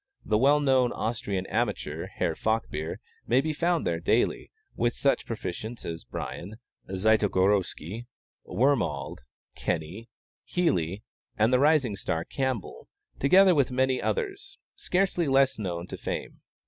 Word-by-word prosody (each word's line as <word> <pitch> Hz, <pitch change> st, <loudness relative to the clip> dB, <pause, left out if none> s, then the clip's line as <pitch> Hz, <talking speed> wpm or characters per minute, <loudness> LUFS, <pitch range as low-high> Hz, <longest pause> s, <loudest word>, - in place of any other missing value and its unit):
The 105 Hz, 0 st, +2 dB
well 140 Hz, +4 st, +5 dB
known 130 Hz, -4 st, +3 dB
Austrian 110 Hz, -4 st, -2 dB
amateur, -, -, -2 dB
Herr -, -, -1 dB
Falkbeer, 110 Hz, -8 st, -2 dB, 0.3 s
may 125 Hz, -, +4 dB
be 155 Hz, +3 st, 0 dB
found 170 Hz, +2 st, +1 dB
there 85 Hz, -1 st, 0 dB
daily, -, -, +1 dB, 0.3 s
with 120 Hz, 0 st, 0 dB
such 140 Hz, -, +1 dB
proficients 110 Hz, +2 st, -5 dB
as 80 Hz, 0 st, -5 dB
Brien, 100 Hz, +5 st, -6 dB, 0.3 s
Zytogorsky, 100 Hz, 0 st, +1 dB, 0.4 s
Wormald, 115 Hz, -, 0 dB, 0.3 s
Kenny, 90 Hz, +8 st, -3 dB, 0.3 s
Healey, 95 Hz, -, 0 dB, 0.3 s
and 110 Hz, +4 st, +3 dB
the 125 Hz, -, +5 dB
rising 140 Hz, -7 st, +3 dB
star, 85 Hz, -3 st, -2 dB
Campbell, 130 Hz, -7 st, -3 dB, 0.3 s
together 185 Hz, +7 st, +6 dB
with 140 Hz, -5 st, +2 dB
many 130 Hz, 0 st, +1 dB
others, 405 Hz, -3 st, -3 dB, 0.2 s
scarcely 180 Hz, -3 st, 0 dB
less 135 Hz, -2 st, +3 dB
known 85 Hz, -4 st, -3 dB
to -, -, -7 dB
fame. -, -, -5 dB
120 Hz, 125 wpm, -27 LUFS, 95-140 Hz, 0.4 s, together